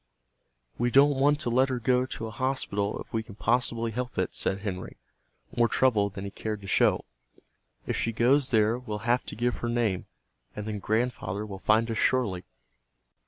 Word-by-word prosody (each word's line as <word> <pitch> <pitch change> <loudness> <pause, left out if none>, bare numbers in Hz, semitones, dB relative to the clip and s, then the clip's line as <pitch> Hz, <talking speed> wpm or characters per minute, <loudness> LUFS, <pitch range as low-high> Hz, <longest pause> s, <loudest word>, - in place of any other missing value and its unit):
"We 120 +1 +2
don't 140 +2 +5
want 145 +2 +3
to 120 - -1
let 130 +3 +3
her 130 - -1
go 125 +1 +2
to 115 - -5
a 110 - -6
hospital 105 -4 -1
if - - -13
we 115 - 0
can 110 -2 -12
possibly 115 0 0
help 125 +2 -4
it," - - -1
said 95 +1 0
Henry, 95 -3 -5 0.6
more 120 0 +4
troubled 105 -6 +2
than 95 - -5
he 100 - -5
cared 105 0 -4
to 100 - -10
show. - - +2 0.8
"If - - -2
she 115 - 0
goes 130 +4 +3
there 110 0 +3
we'll 110 -3 -6
have 120 +2 +3
to - - -6
give 120 +2 0
her 120 - -3
name, 115 -6 0 0.5
and 105 - -5
then 105 -1 -3
Grandfather 110 -2 -1
will 100 -2 -8
find 110 +3 +2
us 110 - -2
surely." 100 -9 +1
115 Hz, 190 wpm, -27 LUFS, 105-125 Hz, 0.8 s, don't